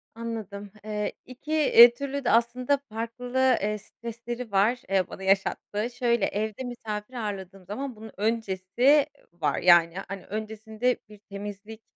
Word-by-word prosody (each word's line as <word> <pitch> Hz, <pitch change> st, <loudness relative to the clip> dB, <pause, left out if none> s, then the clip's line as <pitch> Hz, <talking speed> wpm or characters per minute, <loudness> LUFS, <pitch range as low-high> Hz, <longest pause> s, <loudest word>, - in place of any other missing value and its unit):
Anladım. 215 Hz, -4 st, -6 dB
Eee, 210 Hz, -1 st, -3 dB
2 255 Hz, +4 st, -10 dB
eee, 240 Hz, -6 st, +8 dB
türlü 280 Hz, +2 st, -4 dB
de -, -, +3 dB
aslında 245 Hz, +4 st, +2 dB
farklı, 245 Hz, +3 st, 0 dB
eee, 210 Hz, +1 st, 0 dB
stresleri 235 Hz, +2 st, -7 dB
var, 210 Hz, +6 st, +3 dB
eee, 190 Hz, -2 st, +2 dB
bana 190 Hz, -, -9 dB
yaşattığı. 200 Hz, +3 st, 0 dB
Şöyle, 235 Hz, -3 st, +1 dB
evde 215 Hz, +3 st, -3 dB
misafir 225 Hz, -2 st, -6 dB
ağırladığım 195 Hz, -5 st, -5 dB
zaman 255 Hz, +6 st, -5 dB
bunun 220 Hz, 0 st, -10 dB
öncesi 225 Hz, +6 st, +2 dB, 0.3 s
var. 150 Hz, -4 st, -1 dB
Yani, 175 Hz, -1 st, +6 dB
hani, 195 Hz, -1 st, -7 dB
öncesinde 220 Hz, +3 st, -2 dB
bir 210 Hz, -, -14 dB
temizlik, 205 Hz, +2 st, -8 dB
220 Hz, 135 wpm, -27 LUFS, 200-245 Hz, 0.3 s, eee